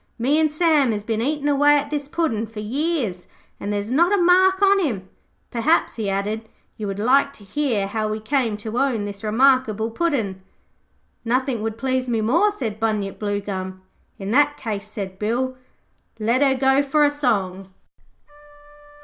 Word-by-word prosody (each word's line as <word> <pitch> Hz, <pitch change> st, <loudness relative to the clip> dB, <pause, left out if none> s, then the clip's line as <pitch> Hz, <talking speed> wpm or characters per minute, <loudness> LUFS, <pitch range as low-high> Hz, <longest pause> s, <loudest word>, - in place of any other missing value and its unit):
Me 270 Hz, +6 st, +2 dB
an' 315 Hz, -1 st, +3 dB
Sam 305 Hz, -4 st, +3 dB
has 205 Hz, -1 st, -4 dB
been 220 Hz, 0 st, -2 dB
eatin' 290 Hz, +3 st, -1 dB
away 290 Hz, +1 st, +4 dB
at 285 Hz, 0 st, -3 dB
this 290 Hz, -2 st, -2 dB
Puddin' 255 Hz, -9 st, -1 dB
for 220 Hz, 0 st, -9 dB
years, 240 Hz, -, -2 dB, 0.3 s
and 205 Hz, -, -4 dB
there's 205 Hz, +2 st, -3 dB
not 340 Hz, +8 st, +3 dB
a 410 Hz, -, +3 dB
mark 370 Hz, +2 st, +4 dB
on 395 Hz, 0 st, +5 dB
him. 220 Hz, -, -2 dB, 0.4 s
Perhaps,' 270 Hz, +6 st, +1 dB
he 215 Hz, -3 st, -2 dB
added, 210 Hz, +3 st, -3 dB, 0.3 s
'you 210 Hz, -, -5 dB
would 195 Hz, 0 st, -4 dB
like 270 Hz, +6 st, +3 dB
to 210 Hz, -, -15 dB
hear 220 Hz, -1 st, -1 dB
how 215 Hz, +2 st, -2 dB
we 215 Hz, 0 st, -3 dB
came 230 Hz, -2 st, 0 dB
to 220 Hz, +3 st, -4 dB
own 250 Hz, -7 st, 0 dB
this 200 Hz, 0 st, -7 dB
remarkable 225 Hz, -1 st, +2 dB
Puddin'.' 225 Hz, -, -1 dB, 0.8 s
'Nothing 250 Hz, 0 st, 0 dB
would 220 Hz, 0 st, -3 dB
please 255 Hz, 0 st, -1 dB
me 230 Hz, -2 st, +1 dB
more,' 310 Hz, -, +3 dB
said 230 Hz, -, -5 dB
Bunyip 215 Hz, -3 st, -1 dB
Bluegum. 195 Hz, -2 st, -4 dB, 0.3 s
'In 195 Hz, +1 st, -5 dB
that 290 Hz, +3 st, +3 dB
case,' 210 Hz, -2 st, -5 dB
said 195 Hz, -3 st, -6 dB
Bill, 250 Hz, +5 st, -1 dB, 0.6 s
'let 230 Hz, +4 st, +1 dB
her 270 Hz, -2 st, +4 dB
go 270 Hz, +1 st, +3 dB
for 295 Hz, +2 st, +2 dB
a 290 Hz, -, +4 dB
song.' 195 Hz, -9 st, -1 dB
235 Hz, 170 wpm, -22 LUFS, 210-285 Hz, 0.8 s, on